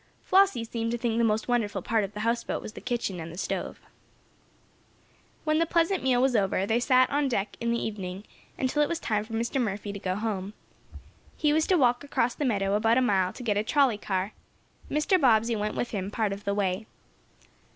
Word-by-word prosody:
Flossie 380 -11 +4
seemed 230 0 -3
to 240 - -1
think 235 -1 -1
the - - +3
most 220 -1 +1
wonderful 210 -6 0
part 225 -1 +1
of 200 +1 -6
the 210 - -4
houseboat 230 +2 -1
was 215 - -8
the - - -9
kitchen 235 -7 -2
and 160 0 -7
the 170 - -10
stove. - - -3 1.6
When 310 0 +2
the 330 - +2
pleasant 340 +3 +2
meal 255 -2 +2
was 260 -1 +2
over, 195 -2 +1
they 225 +3 +1
sat 255 0 +4
on 285 0 +1
deck 210 -5 -2
in 235 - 0
the 235 - +1
evening, 195 -3 -5 0.3
until 265 +3 0
it 295 - +2
was 340 - -1
time 210 -2 -1
for 225 +1 -11
Mr. 235 +4 -1
Murphy 205 -2 -3
to 200 - -6
go 185 -1 -2
home. 205 -1 -3 0.8
He 300 -1 +2
was 315 +1 +2
to 370 - +4
walk 245 -3 +3
across 250 -4 0
the 295 - -3
meadow, 200 -5 +1
about 225 +3 +3
a - - +4
mile, 190 -6 +2
to 250 - -10
get 210 -4 0
a 205 - +1
trolley 255 -3 +2
car. 190 +1 -2 0.6
Mr. 310 +5 +2
Bobbsey 230 -2 +4
went 210 0 -2
with 240 - -2
him, 195 -2 -3
part 210 -1 -1
of 200 +1 -9
the 200 0 0
way. 200 +1 -1
225 Hz, 215 wpm, -27 LUFS, 205-255 Hz, 1.6 s, Flossie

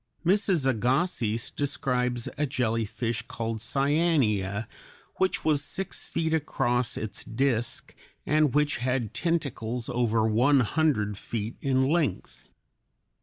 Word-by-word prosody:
Mrs. 185 -5 +3
Agassiz 125 - 0
describes 125 -4 -1
a 150 0 0
jellyfish 115 -2 -1
called 115 -1 -3
Cyanea 115 - +1 0.5
which 190 0 0
was 150 -2 +3
six 190 +4 -4
feet 160 -1 -1
across 125 -5 0
its 105 -2 -5
disk 120 -1 -1 0.3
and 150 -2 +2
which 150 0 +2
had 125 -3 -1
tentacles 125 -8 -1
over 115 -2 +1
one 125 +6 +4
hundred 110 -6 +1
feet 115 0 -4
in 130 -1 +2
length. 150 - -1
125 Hz, 110 wpm, -27 LUFS, 115-150 Hz, 0.5 s, one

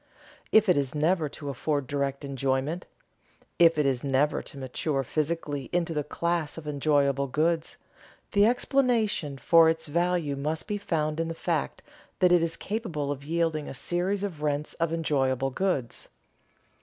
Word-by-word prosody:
If 220 0 +5
it 180 -6 +4
is 140 0 -3
never 155 +1 +1
to 145 0 -7
afford 140 +1 -1
direct 140 +1 -2
enjoyment, 135 +5 -1 0.7
if 165 -2 +6
it 150 - +2
is 130 -3 0
never 140 +2 +1
to - - -11
mature 135 +2 -2
physically 145 -1 -2
into 170 -1 0
the 150 -1 -1
class 170 0 -2
of 165 - -8
enjoyable 140 -1 +1
goods, 160 +4 0 0.5
the 205 +1 +5
explanation 235 - +1
for 165 +3 +6
its 160 0 -1
value 170 -1 0
must 150 +3 -2
be 205 -1 -2
found 155 -4 -1
in 165 - 0
the 165 - -4
fact - - -2 0.3
that 180 -1 +4
it 175 -1 +5
is 165 0 -1
capable 175 -10 -3
of 140 -1 -5
yielding 160 -1 -1
a - - -7
series 180 +8 -1
of 175 -7 -4
rents 150 0 -1
of 165 -1 +1
enjoyable 135 -5 0
goods. 140 -8 -2
155 Hz, 160 wpm, -27 LUFS, 140-170 Hz, 0.7 s, if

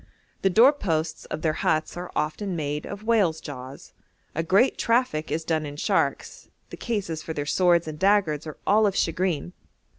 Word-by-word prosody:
The 195 - +3
door 235 +9 +6
posts 160 - -2
of 155 - -6
their 155 -2 +2
huts 155 0 0
are 175 0 -6
often 180 +5 -2
made 150 -1 -3
of 200 +1 -7
whales' 205 -8 +2
jaws; 135 -1 -9 0.4
a 165 - -1
great 195 +10 +3
traffic 230 -10 +1
is 160 - -1
done 160 -2 0
in 145 -1 -6
sharks; 145 - -1 0.2
the - - -8
cases 195 -9 -3
for 160 - -5
their 145 -2 -3
swords 170 +1 +3
and 155 -1 -6
daggers 190 -7 +2
are 155 - -7
all 210 +1 +4
of 195 - -1
shagreen. 175 -1 -1
165 Hz, 180 wpm, -25 LUFS, 155-200 Hz, 0.4 s, door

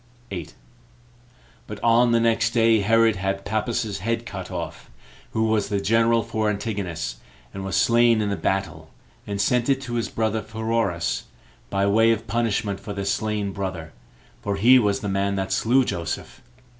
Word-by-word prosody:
8. 90 -5 -6 1.1
But 105 - -7
on 120 +1 +4
the 115 - +4
next 115 0 +2
day 115 -1 +4
Herod 115 +1 +3
had 95 +1 -2
Pappus's 110 -1 -2
head 115 +3 -2
cut 95 -5 -7
off, - - -6 0.4
who 110 - +1
was 110 -2 +1
the 100 -1 0
general 115 +2 +3
for 110 -1 -1
Antigonus, 100 - -3 0.4
and 95 - -6
was 95 -1 -3
slain 115 +2 +4
in 105 -1 0
the - - 0
battle, 80 -6 -2 0.4
and 100 -1 -3
sent 125 +4 +1
it 135 -1 +3
to 120 -3 -6
his 115 -1 -1
brother 110 -1 -1
Pheroras, 110 -7 -1 0.4
by 100 0 +1
way 110 +3 +4
of 115 0 -1
punishment 110 -2 -1
for 100 +1 -7
their 100 -1 -4
slain 105 0 -1
brother; 95 -5 -5 0.5
for 100 -1 -2
he 120 +6 +6
was 105 -4 +1
the 105 - -3
man 100 0 0
that 95 -1 -2
slew 125 +6 +3
Joseph. 85 -7 -4
105 Hz, 170 wpm, -24 LUFS, 100-115 Hz, 1.1 s, he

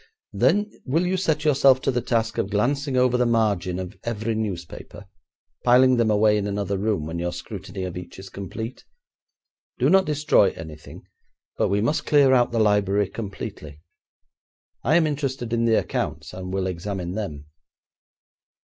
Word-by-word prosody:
'Then 165 - +2
will 160 +7 0
you 185 +1 0
set 160 -5 0
yourself 135 -3 +5
to 135 - 0
the 125 -1 -1
task 115 -2 -1
of 95 - -1
glancing 130 +6 0
over 125 -1 +3
the 125 - +3
margin 105 -6 +1
of 90 -1 -6
every 115 -1 -2
newspaper, 100 -7 -6 0.6
piling 125 +1 +5
them 115 -2 +2
away 105 0 +4
in 100 - -2
another 100 -1 -2
room 100 -5 -1
when 85 +2 -4
your 85 0 -2
scrutiny 95 +1 -7
of 90 -2 -5
each 90 0 -8
is 95 0 -9
complete? 105 +6 -7 0.9
Do - - +2
not 190 0 +5
destroy 150 -9 +3
anything, 80 -2 -10 0.5
but - - +1
we 100 +1 +1
must 150 +7 0
clear 140 -3 +5
out 120 -2 +3
the 120 - -2
library 105 -2 +2
completely. 95 -8 -7 1.0
I 145 +6 +3
am 170 -2 +4
interested 135 -5 -3
in 115 0 +1
the 115 -1 +4
accounts, - - -3
and 90 0 -6
will 95 0 -1
examine 90 0 -4
them.' 90 -8 -5
110 Hz, 165 wpm, -24 LUFS, 95-130 Hz, 1.0 s, yourself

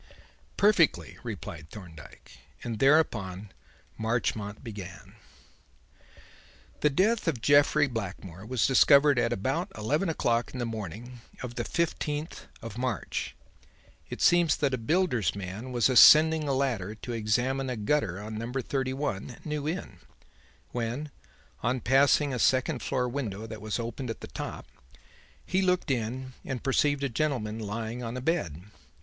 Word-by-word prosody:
"Perfectly," 170 - +3
replied 80 -1 -7
Thorndyke; 80 -7 -13 0.2
and 115 -2 -4
thereupon 105 - +2 0.5
Marchmont 110 -2 -2
began: 100 -7 -9 1.7
"The 150 - +3
death 200 +9 +1
of 150 -8 0
Jeffrey 145 +3 +4
Blackmore 100 - -6
was 120 +2 0
discovered 140 +1 +6
at 115 -1 +1
about 130 +8 -1
eleven 150 - 0
o'clock 120 -7 0
in - - -6
the 120 - -2
morning 115 +3 -7 0.2
of 125 -2 -5
the 120 - -3
fifteenth 155 +1 -2 0.2
of 115 0 -7
March. 125 -5 -3 0.7
It - - -4
seems 170 -3 +4
that 140 -2 0
a 130 - -1
builder's 135 - +1
man 100 +6 -6
was 120 -3 +3
ascending 155 +4 +7
a 140 - +1
ladder 115 -7 -1
to 120 +2 -6
examine 125 +5 0
a 125 - -3
gutter 105 -4 0
on 110 +1 -6
number 125 +3 -3
31, 130 -4 -3
New 150 -1 -3
Inn, 155 - -4 0.7
when, 125 +5 -3 0.5
on 125 +2 0
passing 135 +3 +3
a 125 - -2
second 130 +2 +2
floor 125 -1 -1
window 115 -5 -4
that 110 -2 -8
was 110 -1 -2
open 120 +2 -5
at 115 - -5
the - - -7
top, - - -6 0.8
he 185 +1 +1
looked 180 -5 +1
in 130 +2 -3
and 130 -3 -5
perceived 140 +1 +2
a - - +2
gentleman 120 -5 -2
lying 110 +3 -4
on 120 +1 -4
a - - -4
bed. 105 - -1
125 Hz, 145 wpm, -28 LUFS, 110-145 Hz, 1.7 s, ascending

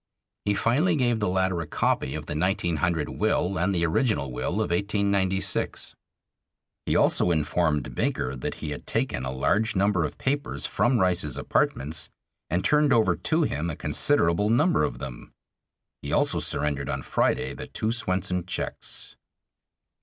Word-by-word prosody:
He 105 0 +2
finally 150 - +2
gave 120 -5 +1
the 105 - 0
latter 95 -1 +1
a 80 - -6
copy 65 -2 0
of 75 -1 -5
the - - -4
1900 85 -2 0
will 90 0 0
and 90 +4 +1
the 85 -1 +2
original 85 - +1
will - - -2
of 105 -1 -1
1896. 100 0 0 0.9
He - - +1
also - - +4
informed 80 -3 0
Baker 65 +1 -1
that 65 - -4
he 75 - -5
had 75 - -7
taken 65 - -1
a 65 - -2
large 105 +12 +1
number 95 -2 +2
of 75 - -4
papers 145 +2 -2
from 125 +1 +2
Rice's 90 - +1
apartments, 75 +4 -1 0.4
and 90 +3 0
turned 150 -1 +4
over 115 -4 +4
to 160 +1 +1
him 80 - -1
a 80 - -3
considerable 105 - +1
number 120 - +3
of - - -1
them. 65 -2 -8 0.7
He - - -5
also - - +2
surrendered 70 -2 -1
on - - -3
Friday - - 0
the - - -7
two 110 - -2
Swenson 90 -5 -1
checks. - - -5
90 Hz, 155 wpm, -26 LUFS, 75-110 Hz, 0.9 s, also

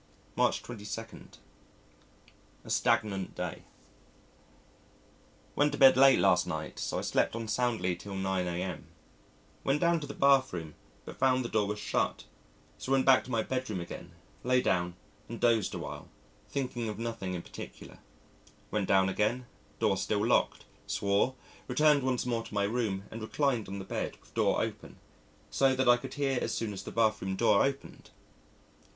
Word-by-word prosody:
March - - +2
22. 115 -1 -6 1.6
A - - -10
Stagnant 100 -4 +1
Day 90 -2 -4 1.9
Went 145 0 +3
to - - -2
bed 135 -1 +8
late 135 0 +7
last - - +3
night - - -5
so - - -2
I - - -1
slept - - +1
on 115 -1 -4
soundly 110 -5 0
till 100 +3 -8
9 95 -1 -1
a.m. 90 +2 -4 0.8
Went 140 +2 +1
down 170 0 +3
to 145 - -7
the 140 - -7
bath 140 -4 +4
room, 80 -3 -5 0.3
but - - -9
found 130 -1 +3
the - - -3
door 105 -2 +1
was 105 +1 -3
shut, - - -1 0.6
so 130 - -5
went 135 -1 +3
back 135 -1 +6
to - - -11
my 115 -3 +1
bedroom 130 -7 -3
again, 85 0 -8 0.3
lay 125 +1 +3
down 90 -6 0 0.3
and 115 - -6
dosed 115 -4 +2
a - - -2
while, - - -7 0.4
thinking 125 -4 -3
of 105 - -5
nothing 115 -5 -4
in 85 - -5
particular. - - -10 0.7
Went 105 -2 0
down 95 -1 +4
again 110 +6 0 0.3
door 95 - +2
still 100 +2 0
locked 120 - +1 0.2
swore 100 +6 +1 0.3
returned 150 +3 +4
once 130 -2 0
more 120 -2 0
to 110 - -10
my 100 - +2
room 105 -3 -1
and 115 - -7
reclined 125 0 0
on 100 - -5
the 95 - -6
bed, - - -4
with - - -24
door - - +2
open, - - -7 0.5
so 135 -1 +3
that 130 0 +1
I 120 - +8
could 130 +1 -8
hear 135 -3 0
as 110 - -1
soon 110 -2 -2
as 95 - -6
the - - -8
bath 110 -2 +2
room 95 0 -2
door 105 -1 +4
opened.... 135 0 -4
115 Hz, 170 wpm, -30 LUFS, 100-130 Hz, 1.9 s, bed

